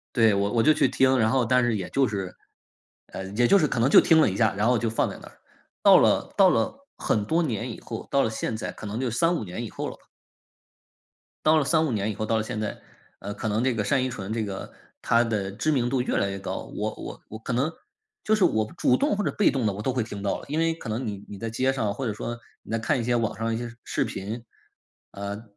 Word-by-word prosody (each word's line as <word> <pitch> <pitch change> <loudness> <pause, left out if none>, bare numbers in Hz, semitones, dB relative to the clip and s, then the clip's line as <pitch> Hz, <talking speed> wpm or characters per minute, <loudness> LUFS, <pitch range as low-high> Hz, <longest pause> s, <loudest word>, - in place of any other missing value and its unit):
对， 115 -3 +5
我 100 +1 0
我 115 - +3
就 155 - +6
去 - - +3
听， 130 0 +3
然 110 - +3
后 130 0 +2
但 125 +2 +3
是 120 -2 +1
也 95 - -4
就 135 -2 +2
是， 95 -3 -4 0.7
嗯， 95 +1 -7
也 120 0 +4
就 200 - +6
是 155 - +3
可 125 - -2
能 120 +4 +3
就 - - +8
听 160 -2 +5
了 155 - +5
一 95 - -4
下， 110 -1 +2
然 105 +3 +1
后 125 -1 +4
就 115 0 -1
放 115 - 0
在 - - -8
那。 - - -12 0.5
到 - - +8
了 - - +2
到 - - +6
了 275 - -1
很 105 - 0
多 165 +9 +1
年 120 -4 -2
以 - - -8
后， 115 - -7
到 140 - +4
了 - - +1
现 110 +1 -3
在 - - -4
可 - - -10
能 105 +2 -4
得 130 - -1
有 120 - -1
3-5 165 +5 +1
年 105 +5 -5
以 115 - -5
后 - - -5
了 - - -7
吧。 - - -28 1.4
到 155 +1 +5
了 155 - +3
3-5 160 0 +2
年 105 -1 -1
以 - - -7
后 110 - -3
到 110 +1 +1
了 110 - 0
现 110 0 -4
在， 110 - -4 0.4
呃， 100 - -5
可 110 - -4
能 110 +3 0
这 130 - +2
个 110 -2 -1
单 130 +6 +1
依 130 - -1
纯 100 -4 -6
这 115 -1 -1
个 100 -2 -6 0.3
她 115 0 +3
的 105 -4 -2
知 120 +10 -1
名 125 -4 +1
度 130 -1 +1
越 125 - -1
来 100 - +1
越 95 - -4
高， - - -4
我 - - -2
我 - - -8
我 110 - -8
可 115 - -4
能 135 +7 +1 0.5
就 220 - +3
是 215 - +2
我 110 -8 +2
主 125 - +3
动 210 - +1
或 205 - -1
者 - - 0
被 210 - +3
动 130 -4 -1
地 105 - +1
我 105 - -6
都 130 - -1
会 125 -2 0
听 105 -2 -7
到 100 - -1
了。 - - -12
因 150 +2 -1
为 165 0 +2
可 160 -8 -8
能 115 +4 -2
你 100 -1 -5
你 100 - -8
在 115 +3 -4
街 130 +4 +1
上 110 -6 -1
或 135 +5 -4
者 110 - -1
说， 120 +2 -5 0.3
你 - - -11
在 115 - +1
看 115 +3 0
一 - - -2
些 120 +1 +1
网 115 -2 0
上 115 0 -1
一 - - -1
些 120 0 -6
视 - - -1
频， 110 +5 -5 0.7
呃 100 +2 -6
115 Hz, 295 characters per minute, -26 LUFS, 105-130 Hz, 1.4 s, 就